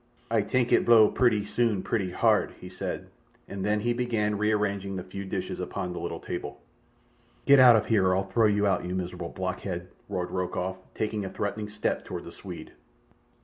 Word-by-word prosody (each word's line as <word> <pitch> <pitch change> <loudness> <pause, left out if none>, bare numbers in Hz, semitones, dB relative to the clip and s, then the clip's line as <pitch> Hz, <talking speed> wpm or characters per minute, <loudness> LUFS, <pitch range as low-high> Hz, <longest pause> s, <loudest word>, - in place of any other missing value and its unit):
"Ay 115 -2 +3
tank 120 +3 0
it - - +5
blow 110 -3 +7
purty 110 -5 +2
soon 110 -3 0
purty 100 -5 -1
hard," - - +2
he 90 - -9
said, 95 0 -5 0.4
and 100 -1 -5
then 105 +1 +1
he 120 +2 +1
began 115 -4 0
rearranging 100 -2 0
the 90 - -4
few 100 +2 -7
dishes 95 - -4
upon 90 -1 -4
the - - -5
little - - -4
table. - - -6 0.9
"Get 140 -1 +7
out 125 -2 +9
of 110 - +2
here, 100 -5 +3
or 90 - +3
I'll 95 - +1
throw 100 +4 +2
you 105 0 +2
out, 95 -3 +1
you 90 +1 -3
miserable 90 -2 -4
blockhead!" - - -4 0.2
roared 90 -1 -3
Rokoff, 90 0 -2 0.2
taking 105 -1 -2
a 95 - -4
threatening 105 +2 -3
step 105 0 -2
toward - - -6
the - - -9
Swede. - - -9
105 Hz, 190 wpm, -27 LUFS, 95-110 Hz, 0.9 s, out